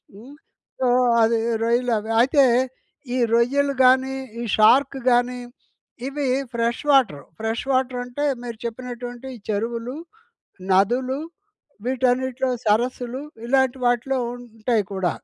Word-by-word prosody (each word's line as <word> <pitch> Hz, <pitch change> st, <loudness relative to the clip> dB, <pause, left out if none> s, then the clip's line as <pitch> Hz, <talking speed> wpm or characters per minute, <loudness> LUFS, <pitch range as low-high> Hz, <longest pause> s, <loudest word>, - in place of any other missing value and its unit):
హ్మ్. 250 Hz, +8 st, -13 dB, 0.5 s
సో, 255 Hz, -, +2 dB, 0.4 s
అది 230 Hz, 0 st, +2 dB, 0.2 s
రొయ్యలు 240 Hz, +1 st, +1 dB
అవి. 220 Hz, +2 st, -6 dB
అయితే, 275 Hz, +2 st, +4 dB, 0.7 s
ఈ -, -, 0 dB, 0.2 s
రొయ్యలు 275 Hz, +4 st, +2 dB
గానీ, 260 Hz, +1 st, +4 dB, 0.3 s
ఈ -, -, -3 dB
షార్క్ 270 Hz, +5 st, +5 dB
గానీ, 245 Hz, +1 st, +2 dB, 0.7 s
ఇవి 280 Hz, 0 st, -2 dB, 0.3 s
ఫ్రెష్ 235 Hz, +2 st, -1 dB
వాటర్. 225 Hz, -, +3 dB, 0.2 s
ఫ్రెష్ 225 Hz, +3 st, -2 dB
వాటర్ 255 Hz, -1 st, 0 dB
అంటే 250 Hz, +4 st, -5 dB, 0.2 s
మీరు 235 Hz, -2 st, -6 dB
చెప్పినటువంటివి. 245 Hz, +1 st, -6 dB
చెరువులు, 230 Hz, +4 st, -2 dB, 0.8 s
నదులు 245 Hz, +7 st, +2 dB, 0.7 s
వీటన్నిటిలో 260 Hz, 0 st, 0 dB, 0.2 s
సరస్సులు. 245 Hz, +4 st, 0 dB, 0.2 s
ఇలాంటి 265 Hz, 0 st, +2 dB
వాటిలో 245 Hz, +2 st, +1 dB, 0.2 s
ఉంటాయి 225 Hz, -2 st, -2 dB
కూడా. 180 Hz, -3 st, 0 dB
245 Hz, 110 wpm, -22 LUFS, 230-260 Hz, 0.8 s, షార్క్